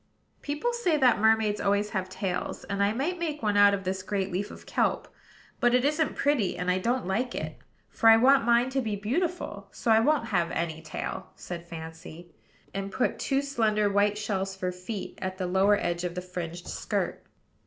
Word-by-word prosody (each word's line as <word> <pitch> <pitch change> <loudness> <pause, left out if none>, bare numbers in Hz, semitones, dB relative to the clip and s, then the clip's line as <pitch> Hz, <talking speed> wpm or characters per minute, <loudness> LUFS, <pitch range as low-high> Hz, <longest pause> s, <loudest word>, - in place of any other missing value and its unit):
"People 295 +12 -2
say 370 -10 +1
that 255 -5 +4
mermaids 220 -1 +3
always 205 +1 +1
have 190 -2 -2
tails; 185 -1 -3
and 200 0 -3
I 200 +1 +3
might 300 +11 -2
make 305 -6 -3
one 210 -1 +1
out 205 0 +6
of 195 - -6
this 190 0 -2
great 195 0 -2
leaf 200 +4 -2
of - - -12
kelp. - - 0 0.5
But 240 0 +4
it 250 +1 +3
isn't 300 +1 +1
pretty, 280 -12 +1
and 180 +1 0
I 185 - +1
don't 240 +4 0
like 235 +7 -1
it; - - -5 0.3
for 225 - +3
I 225 - +9
want 265 +2 +5
mine 240 +2 +3
to 270 0 0
be 220 -4 -2
beautiful: 220 - -2
so 230 - -1
I 220 - +7
won't 235 -1 +2
have 175 -5 +1
any 160 -1 -3
tail," - - -5
said 170 -1 -7
Fancy, 165 +1 -9 0.4
and 195 0 -4
put 250 - 0
two 275 +1 0
slender 215 -7 +1
white 205 +1 +2
shells 195 -2 -2
for 185 -1 -2
feet, 180 +3 -7
at 190 0 -3
the 185 - -2
lower 190 +3 +3
edge 175 -1 -2
of 175 -1 -3
the 180 - -3
fringed 175 -1 -6
skirt. - - -2
205 Hz, 200 wpm, -28 LUFS, 185-245 Hz, 0.5 s, I